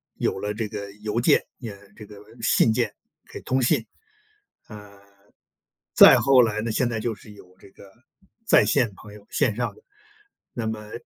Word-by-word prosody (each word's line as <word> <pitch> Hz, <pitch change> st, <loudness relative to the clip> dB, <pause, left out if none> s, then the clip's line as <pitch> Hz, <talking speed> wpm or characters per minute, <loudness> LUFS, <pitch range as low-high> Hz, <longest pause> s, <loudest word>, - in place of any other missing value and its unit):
有 -, -, -2 dB
了 105 Hz, +1 st, -3 dB
这 110 Hz, 0 st, -4 dB
个 100 Hz, -1 st, -7 dB
邮 105 Hz, +2 st, -3 dB
件， -, -, +3 dB
也 115 Hz, -5 st, -8 dB, 0.2 s
这 105 Hz, -, -12 dB
个 105 Hz, 0 st, -14 dB, 0.2 s
信 115 Hz, -, +3 dB
件， -, -, -1 dB, 0.4 s
给 -, -, -9 dB
通 130 Hz, +1 st, -1 dB
信。 120 Hz, -2 st, +1 dB, 0.8 s
呃， 105 Hz, -2 st, -13 dB, 0.9 s
再 -, -, +8 dB
后 135 Hz, -2 st, +5 dB
来 110 Hz, -2 st, 0 dB
呢， 115 Hz, +1 st, -3 dB
现 120 Hz, +3 st, 0 dB
在 115 Hz, -2 st, -3 dB
就 115 Hz, 0 st, -3 dB
是 105 Hz, +1 st, -16 dB
有 90 Hz, -2 st, -18 dB
这 -, -, -17 dB
个， 100 Hz, -, -17 dB, 0.6 s
在 225 Hz, -, +5 dB
线 115 Hz, -4 st, +1 dB
朋 105 Hz, +1 st, -14 dB
友， 105 Hz, -1 st, -15 dB
线 105 Hz, -, 0 dB
上 120 Hz, -, -3 dB
的。 -, -, -21 dB, 0.7 s
那 115 Hz, -2 st, -4 dB
么， 105 Hz, -1 st, -6 dB
110 Hz, 190 characters per minute, -23 LUFS, 105-115 Hz, 0.9 s, 再